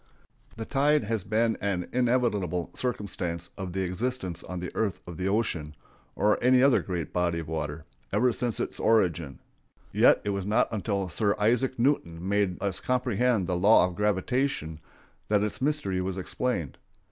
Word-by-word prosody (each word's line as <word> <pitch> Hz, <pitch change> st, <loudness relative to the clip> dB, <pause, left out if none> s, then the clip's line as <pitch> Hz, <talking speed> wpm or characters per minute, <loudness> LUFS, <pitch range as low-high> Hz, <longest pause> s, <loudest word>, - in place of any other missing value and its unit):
] 110 Hz, -, -29 dB
The 110 Hz, -, -4 dB
tide 145 Hz, +1 st, +2 dB
has 110 Hz, -2 st, -2 dB
been 110 Hz, +2 st, +1 dB
an 95 Hz, -3 st, -1 dB
inevitable 115 Hz, -9 st, 0 dB
circumstance 90 Hz, -8 st, -3 dB
of 95 Hz, -2 st, -5 dB
the 95 Hz, -, -1 dB
existence 95 Hz, 0 st, -3 dB
on 90 Hz, -1 st, -6 dB
the 90 Hz, 0 st, -5 dB
earth 110 Hz, -4 st, -1 dB
of 85 Hz, -, -8 dB
the 95 Hz, +1 st, -2 dB
ocean, 90 Hz, -8 st, -1 dB, 0.4 s
or 105 Hz, +3 st, +2 dB
any 125 Hz, +1 st, +5 dB
other 140 Hz, -2 st, +5 dB
great 90 Hz, -4 st, -4 dB
body 85 Hz, -1 st, +1 dB
of 80 Hz, -2 st, -5 dB
water, 80 Hz, 0 st, -4 dB, 0.3 s
ever 125 Hz, 0 st, +3 dB
since 120 Hz, -1 st, -2 dB
its -, -, -2 dB
origin, 85 Hz, -10 st, +1 dB, 0.5 s
yet -, -, +5 dB
it 100 Hz, -, -1 dB
was 100 Hz, -1 st, -3 dB
not 105 Hz, +2 st, +2 dB
until 100 Hz, -2 st, -1 dB
Sir 100 Hz, +3 st, 0 dB
Isaac 120 Hz, +5 st, +1 dB
Newton 95 Hz, -, 0 dB
made 100 Hz, -2 st, +1 dB
us 100 Hz, -3 st, 0 dB
comprehend 125 Hz, -4 st, +1 dB
the 90 Hz, -, -1 dB
law 100 Hz, +2 st, +5 dB
of 90 Hz, -1 st, -4 dB
gravitation 105 Hz, -, -1 dB, 0.5 s
that 105 Hz, -1 st, +2 dB
its 105 Hz, +3 st, -3 dB
mystery 130 Hz, -11 st, 0 dB
was 95 Hz, 0 st, -3 dB
explained. 95 Hz, -, -3 dB
100 Hz, 170 wpm, -27 LUFS, 90-120 Hz, 0.5 s, any